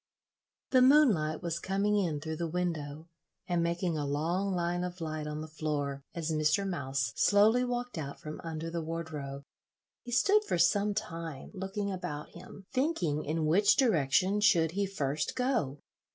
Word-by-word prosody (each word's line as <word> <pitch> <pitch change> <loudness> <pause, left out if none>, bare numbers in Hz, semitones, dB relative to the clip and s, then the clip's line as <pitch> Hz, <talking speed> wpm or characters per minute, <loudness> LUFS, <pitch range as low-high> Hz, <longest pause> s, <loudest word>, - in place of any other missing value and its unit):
The 255 - +6
moonlight 250 - +4
was 170 -1 -2
coming 200 +3 0
in 170 -7 0
through 160 +1 -5
the 170 - -2
window 160 -3 -3 0.4
and 175 -1 +1
making 170 -1 -1
a 145 - -1
long 170 +7 0
line 175 0 -1
of 180 0 -5
light 155 -2 -4
on 150 0 -4
the 155 - -6
floor 150 -3 -3
as 165 -1 -2
Mr. 155 +6 +2
Mouse 135 -9 -2
slowly 215 +4 +4
walked 245 -5 -3
out 140 -2 -6
from 155 0 -7
under 165 0 -5
the 170 0 -2
wardrobe. 155 -4 -5 0.6
He 245 - -9
stood 405 - +4
for - - 0
some 200 +4 +3
time 165 -9 -5
looking 200 +1 -3
about 175 -6 -5
him, 185 +2 -12
thinking 190 - 0
in 155 +1 -1
which 195 +7 +4
direction 185 - +3
should 165 -6 +4
he 200 +3 -1
first 150 -6 -2
go. 245 - 0
170 Hz, 165 wpm, -31 LUFS, 155-200 Hz, 0.6 s, The